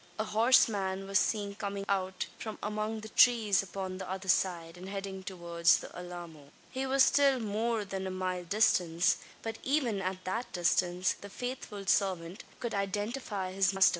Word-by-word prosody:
A 215 - 0
horseman 210 -4 +3
was 195 0 +3
seen 205 -2 0
coming 200 -1 -4
out 190 -1 -1
from 220 -1 -5
among 215 +1 -2
the 220 - -8
trees 220 -6 +5
upon 190 0 -5
the 190 - -6
other 190 0 -5
side, 170 -3 +1
and 185 +2 -9
heading 195 -1 -5
towards 170 -3 +2
the - - -9
Alamo. 175 -5 -9 0.2
He 265 +1 -2
was 270 0 +5
still 275 -2 +4
more 220 0 -1
than 190 -1 -4
a - - -2
mile 185 -1 -2
distant; 175 -3 +3 0.3
but, 225 0 -4
even 255 -8 0
at 185 0 -3
that 225 +6 -3
distance, 180 +1 +2
the 200 - -9
faithful 230 -4 -6
servant 185 -1 0 0.2
could 235 - -3
identify 205 0 -2
his 195 +1 +2
master. 195 0 +7
195 Hz, 165 wpm, -31 LUFS, 185-215 Hz, 0.3 s, master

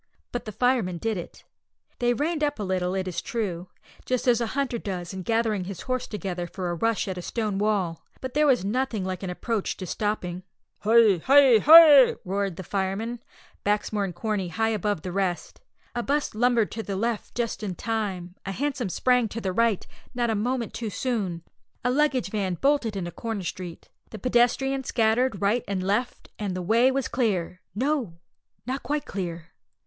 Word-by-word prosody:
But 245 - -4
the 215 - -5
firemen 230 -6 +1
did 225 +5 -1
it. 175 - -9 0.6
They 240 -1 +2
reined 305 +3 -1
up 290 -1 0
a 210 - -3
little, 185 -1 -1
it 190 -1 -2
is 180 - -3
true, 185 -6 -3 0.4
just 255 0 -1
as 240 -1 +4
a 235 - 0
hunter 260 -4 0
does 185 -4 -5
in 190 - -5
gathering 220 -2 0
his 190 -2 -6
horse 255 -1 -2
together 185 -4 -4
for 180 0 -4
a - - -1
rush 225 +6 0
at 185 -2 -3
a - - -5
stone 210 0 -2
wall, 200 -6 0 0.2
but 260 -1 -6
there 300 +1 +3
was 250 -8 +3
nothing 225 -2 -1
like 185 -1 -4
an 190 - -4
approach 210 +3 -2
to 185 - -5
stopping. 185 -2 -2 0.4
"Hi! 220 -2 +5
Hi!! 270 -4 +7
Hi!!!" 300 -2 +9
roared 195 -1 -1
the 190 - -7
firemen, 200 +6 -2 0.4
Baxmore 210 0 0
and 180 -3 -6
Corney 205 -1 -2
high 220 +6 0
above 210 -5 -1
the 180 - -4
rest. 185 -2 -2 0.3
A 240 - -1
'bus 285 +4 -1
lumbered 235 -1 +2
to 225 - -4
the 200 -3 -4
left 225 +2 -2
just 235 -2 -2
in 195 -4 -3
time; 195 -5 -3
a 195 - -4
hansom 265 -3 -2
sprang 250 +4 +2
to 220 +2 -5
the 190 -4 -2
right, 230 -2 +2 0.3
not 240 -2 +1
a - - +1
moment 235 +2 -1
too 225 -2 -4
soon; 195 -5 -2 0.4
a 250 - +2
luggage 265 -6 +1
van 195 -4 -1
bolted 270 - +1
into 175 -3 -3
Crown 225 -2 -4
Street; 175 -1 -7 0.2
the 220 - -8
pedestrians 255 +3 +1
scattered 225 -2 +1
right 220 +4 +2
and 195 -2 -2
left, 210 +6 -1
and 200 -3 -2
the 185 - -3
way 230 +7 +4
was 265 -1 -1
clear 185 -7 -1
no, 255 - -1 0.5
not 260 +3 -3
quite 295 0 -2
clear! 170 -4 -5
215 Hz, 190 wpm, -26 LUFS, 190-245 Hz, 0.6 s, Hi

